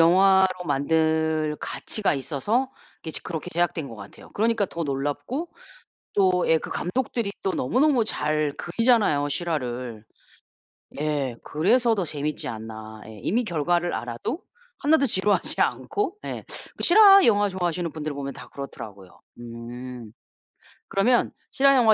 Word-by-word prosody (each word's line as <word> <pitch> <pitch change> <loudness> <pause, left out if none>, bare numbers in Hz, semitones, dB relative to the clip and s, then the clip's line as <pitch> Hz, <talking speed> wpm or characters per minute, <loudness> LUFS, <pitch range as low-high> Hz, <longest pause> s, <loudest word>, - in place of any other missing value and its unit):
영화로 185 +1 +5
만들 160 +1 +1
가치가 210 -8 -1
있어서 180 - -1 0.3
그게 160 - -8
이제 - - -2
그렇게 170 0 -5
제작된 170 -4 -1
것 115 - -10
같아요. 100 -1 -12
그러니까 225 0 +1
더 170 -2 -4
놀랍고 145 - -3 0.6
또 185 -2 +3
예 160 - +5
그 - - -8
감독들이 230 +2 -2
또 190 - 0
너무너무 255 - +2
잘 150 -6 0
그리잖아요 200 - +2
실화를. 125 -9 -3 1.0
예 145 -5 -1
그래서 225 +9 +2
더 195 - 0
재밌지 150 -2 -3
않나. 110 -1 -8
예. 110 -1 -11
이미 240 +6 +1
결과를 175 0 0
알아도 120 - -4 0.4
하나도 295 0 +3
지루하지 205 -3 +2
않고 410 -2 -1
예 - - -5 0.3
그 - - -5
실화 395 +1 +8
영화 205 -2 +4
좋아하시는 175 -2 -2
분들을 155 -1 -4
보면 140 -1 -4
다 - - -11
그렇더라고요. 105 -9 -9 0.3
음. 120 0 -8 0.8
그러면 235 +5 +3 0.2
실화영화 265 -5 +5
165 Hz, 310 characters per minute, -25 LUFS, 140-215 Hz, 1.0 s, 실화